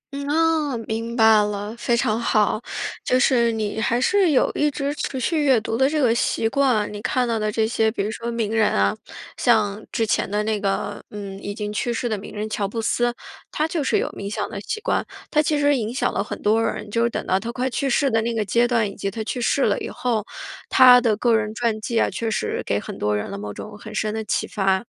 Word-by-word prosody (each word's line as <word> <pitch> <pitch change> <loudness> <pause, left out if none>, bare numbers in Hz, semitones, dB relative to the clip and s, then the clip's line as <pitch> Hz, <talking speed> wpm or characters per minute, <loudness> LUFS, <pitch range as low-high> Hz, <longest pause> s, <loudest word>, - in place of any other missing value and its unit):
嗯， 280 0 -4
啊， 315 -4 +1
明 230 +1 -3
白 220 -2 +6
了。 205 +1 -4
非 235 0 0
常 230 -3 +1
好， 215 -1 +1 0.4
就 255 - +2
是 235 -3 +3
你 220 0 -2
还 235 +1 +1
是 375 +6 +3
有 275 - +3
一 295 - +2
直 285 0 -2
持 270 -3 -4
续 300 +5 0
阅 260 -5 +4
读 225 +1 -3
的 265 +3 +3
这 310 0 0
个 240 -4 +3
习 230 -1 0
惯， 245 -5 +1
你 205 - -6
看 250 +2 0
到 225 -1 0
的 215 0 -1
这 220 0 +1
些 225 -1 +1
比 205 -3 -2
如 215 - -2
说 235 +1 -5
名 230 -2 -2
人 220 -1 +4
啊， 100 0 +2 0.4
像 215 -3 +2
之 225 - 0
前 215 - 0
的 210 +1 0
那 215 -1 -1
个， 200 0 -2
嗯 200 -2 -7
已 205 0 -5
经 210 -1 -4
去 240 - -1
世 240 +1 -2
的 220 - -1
名 205 +1 -9
人 210 +1 -3
乔 205 -2 -2
布 225 +3 -5
斯， 240 +2 +1 0.4
他 310 +1 0
就 320 -3 -2
是 - - +2
有 - - 0
冥 200 0 -6
想 210 -2 -2
的 200 - -5
习 435 - -4
惯， - - 0 0.3
他 300 - +4
其 300 0 0
实 290 0 +3
影 225 -3 -2
响 255 - -1
了 200 - 0
很 - - -6
多 220 +2 +3
人， 210 - -3
就 230 +2 +1
是 235 - +2
等 - - -4
到 190 - +1
他 230 +3 -5
快 255 +1 -2
去 270 +2 -1
世 275 +2 +2
的 225 0 +2
那 230 0 -2
个 215 -2 0
阶 235 +5 +2
段， 230 -4 +1
以 200 - -7
及 195 - -3
他 220 +2 -5
去 245 +3 -4
世 270 +3 +2
了 205 - +2
以 - - -5
后， 230 -4 -1 0.5
他 250 -1 +8
的 220 -4 +1
个 235 0 +3
人 215 0 -1
传 230 -3 -1
记 230 +1 -1
啊 - - +3
确 230 -1 -2
实 215 - -2
给 100 - +1
很 - - -8
多 105 0 +1
人 105 - -4
了 100 - -5
某 105 0 -5
种 210 - -9
很 215 0 -9
深 215 0 -1
的 220 0 -3
启 210 - -1
发。 195 0 0
225 Hz, 275 characters per minute, -22 LUFS, 210-250 Hz, 0.5 s, 他